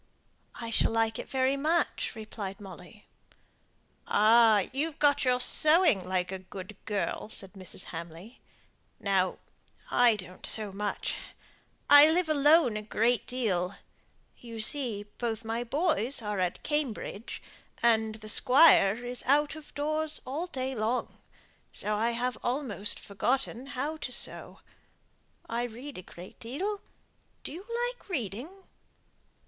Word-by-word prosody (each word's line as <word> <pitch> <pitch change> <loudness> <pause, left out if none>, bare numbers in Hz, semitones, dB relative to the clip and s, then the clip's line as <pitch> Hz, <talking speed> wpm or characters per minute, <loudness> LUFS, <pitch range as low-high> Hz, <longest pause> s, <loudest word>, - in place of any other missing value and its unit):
"I 230 -1 -6
shall - - +3
like 225 -1 0
it - - -7
very 265 0 +1
much," 315 +5 0
replied 215 -3 -7
Molly. 195 +1 -12 1.0
"Ah! 220 -1 +5
you've 300 +3 -2
got 285 -1 +3
your 250 0 +3
sewing, 310 - +4
like 185 0 -2
a 190 - -4
good 190 +2 -10
girl," 210 0 -2
said 195 -3 -2
Mrs. 185 -1 -4
Hamley. 170 +7 -9 0.6
"Now, 190 -2 +1 0.5
I 245 -2 +5
don't 185 -2 -10
sew 215 -2 +3
much. 205 +1 -3 0.7
I 290 +1 +9
live 345 0 +1
alone 295 -5 +4
a - - -4
great 225 +3 0
deal. 200 -7 -1 0.6
You 230 -2 -9
see, 230 -3 +1 0.2
both 225 -2 -3
my 225 +2 -2
boys 285 -1 +1
are 210 -2 -2
at 180 -1 -2
Cambridge, 270 -6 -3 0.4
and 220 -2 +3
the 215 -1 -11
squire 245 -3 +5
is 245 0 -4
out 295 +3 +3
of 310 -1 -12
doors 310 +1 0
all 300 +7 -3
day 265 -5 -4
long 230 +1 -2 0.5
so 210 0 -2
I 225 +3 +1
have 250 +1 -2
almost 245 -6 -1
forgotten 250 +4 -2
how 300 +5 -2
to 270 - -5
sew. - - -1 0.9
I 230 +1 -2
read 245 +2 -7
a - - -7
great 180 0 -13
deal. 380 - -4 0.6
Do - - -6
you 345 +6 -8 0.3
like - - -21
reading?" 285 - -5
235 Hz, 135 wpm, -29 LUFS, 210-285 Hz, 1.0 s, I